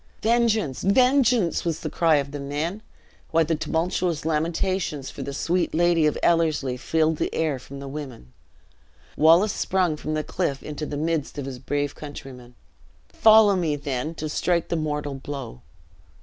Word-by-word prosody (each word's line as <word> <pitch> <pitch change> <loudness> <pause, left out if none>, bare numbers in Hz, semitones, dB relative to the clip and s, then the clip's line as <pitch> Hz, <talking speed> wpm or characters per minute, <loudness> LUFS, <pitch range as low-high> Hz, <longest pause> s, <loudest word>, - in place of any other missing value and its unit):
"Vengeance! 220 - +1
vengeance!" 250 -2 +3
was 165 -2 -2
the 160 - -3
cry 165 -1 +3
of 140 -1 -1
the 145 - -5
men, 150 +8 -3 0.5
while 165 -1 +3
tumultuous 165 +1 -1
lamentations 160 -1 -1
for - - -8
the 140 - -4
"sweet 170 +6 -1
Lady 170 -2 +3
of 150 - 0
Ellerslie," 155 -6 +2
filled 160 +4 0
the - - -1
air 155 -5 0
from 140 +2 -10
the 140 - -7
women. 135 - -8 0.8
Wallace 170 +7 +5
sprung 180 -4 0
from 155 +1 -3
the 155 - -1
cliff 140 -1 -2
into 150 0 -5
the 145 - -4
midst 160 -2 -2
of 140 - -4
his 130 -2 -6
brave 145 +2 -2
countrymen. 135 -5 -10 0.5
"Follow 220 -2 +6
me, 165 -5 0
then, 145 +2 -3
to 155 - -4
strike 170 +2 0
the - - 0
mortal 150 -2 -2
blow!" 135 - -7
155 Hz, 160 wpm, -24 LUFS, 145-175 Hz, 0.8 s, Follow